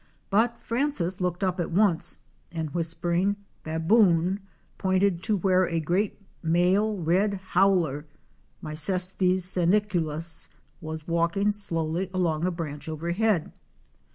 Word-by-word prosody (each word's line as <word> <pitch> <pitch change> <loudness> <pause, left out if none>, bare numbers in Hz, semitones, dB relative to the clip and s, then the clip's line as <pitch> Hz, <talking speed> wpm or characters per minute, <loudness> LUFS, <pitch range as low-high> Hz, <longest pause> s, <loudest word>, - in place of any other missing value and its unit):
But 235 +4 +2
Francis 230 -8 -1
looked 180 +1 -1
up 185 -1 0
at 170 - -1
once 185 -2 +1 0.3
and 160 -3 -4
whispering 175 +4 0 0.3
''Baboon'' 175 +2 +3 0.4
pointed 190 -2 +1
to 215 -2 +1
where 185 0 +3
a 165 -1 -1
great 180 +7 -1 0.2
male 185 +6 +2
red 185 +4 +1 0.2
howler 175 -6 +2 0.6
(Mycetes 180 +4 +1
seniculus) 175 -4 +1 0.3
was 155 -1 -6
walking 170 +5 +1
slowly 175 -3 -2
along 170 -3 0
a - - 0
branch 150 -3 -6
overhead. 170 +4 0
180 Hz, 110 wpm, -26 LUFS, 165-195 Hz, 0.6 s, Baboon